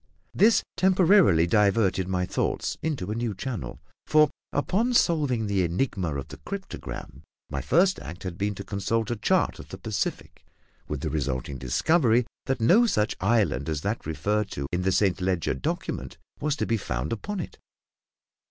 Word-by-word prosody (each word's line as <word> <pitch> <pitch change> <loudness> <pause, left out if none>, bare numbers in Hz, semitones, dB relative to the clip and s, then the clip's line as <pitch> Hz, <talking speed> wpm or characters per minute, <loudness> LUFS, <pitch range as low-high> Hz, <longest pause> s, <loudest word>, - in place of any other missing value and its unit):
This 220 +2 +4
temporarily 185 - +5
diverted 100 -1 +2
my 90 -1 0
thoughts - - -1
into 140 -12 -2
a - - -2
new 115 -3 -2
channel; 100 - -5 0.3
for, 155 -2 +5 0.2
upon 215 - +1
solving 145 - +2
the 100 -2 +1
enigma 90 - -1
of 70 - -5
the - - -9
cryptogram, 200 -1 -7 0.3
my - - -2
first 185 +1 +3
act 85 +5 -9
had 90 -2 -4
been 100 +2 -2
to 100 - -6
consult 105 +3 -1
a - - 0
chart 105 - +1
of - - -11
the - - -7
Pacific, - - -4 0.4
with - - -4
the - - -2
resulting 65 -2 -2
discovery 120 - +2 0.2
that 135 -1 0
no 195 - +5
such 105 - +1
island 100 - +1
as 75 -2 -2
that 105 -1 -3
referred 100 +7 -1
to 70 - -4
in 90 - 0
the 95 +1 +1
Saint 95 0 +2
Leger 90 -3 0
document 65 +1 -4 0.2
was 150 0 0
to - - -1
be 115 - +1
found 65 - -3
upon 205 - -4
it. 170 - -7
105 Hz, 170 wpm, -26 LUFS, 90-140 Hz, 0.4 s, temporarily